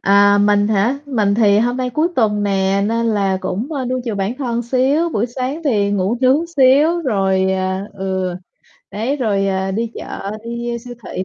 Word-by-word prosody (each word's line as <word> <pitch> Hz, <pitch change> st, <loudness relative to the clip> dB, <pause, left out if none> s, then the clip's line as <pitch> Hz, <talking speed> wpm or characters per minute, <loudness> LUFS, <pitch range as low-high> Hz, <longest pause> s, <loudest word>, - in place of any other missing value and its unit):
À, 200 Hz, +1 st, +4 dB
mình 205 Hz, 0 st, +3 dB
hả? 220 Hz, +6 st, +1 dB
Mình 215 Hz, -7 st, +1 dB
thì 205 Hz, -2 st, +4 dB
hôm 240 Hz, +3 st, +1 dB
nay 255 Hz, -1 st, -2 dB
cuối 310 Hz, +7 st, +1 dB
tuần 210 Hz, -3 st, +2 dB
nè 195 Hz, 0 st, +1 dB
nên 230 Hz, +1 st, 0 dB
là 200 Hz, -4 st, +1 dB
cũng, 220 Hz, -, -4 dB
ơ, 275 Hz, -3 st, -2 dB
nuông 255 Hz, +1 st, -2 dB
chiều 230 Hz, -4 st, -3 dB
bản 195 Hz, +3 st, -2 dB
thân 240 Hz, -4 st, -2 dB
xíu. 265 Hz, +7 st, +1 dB
Buổi 230 Hz, -7 st, -1 dB
sáng 255 Hz, +5 st, -4 dB
thì 205 Hz, -7 st, +1 dB
ngủ 200 Hz, +3 st, 0 dB
nướng 275 Hz, +6 st, +3 dB
xíu 290 Hz, +6 st, +4 dB
rồi, 190 Hz, -, +1 dB
à 190 Hz, 0 st, -2 dB
ừ, 190 Hz, -2 st, -3 dB, 0.6 s
đấy, 225 Hz, +8 st, -2 dB
rồi, 205 Hz, -7 st, 0 dB
à, 190 Hz, 0 st, -1 dB
đi 225 Hz, +4 st, -2 dB
chợ, 195 Hz, -, -6 dB
đi 235 Hz, +1 st, -4 dB
vô 235 Hz, -, -2 dB
siêu 245 Hz, +1 st, -10 dB
thị, 185 Hz, -, -4 dB
220 Hz, 200 wpm, -18 LUFS, 195-255 Hz, 0.6 s, À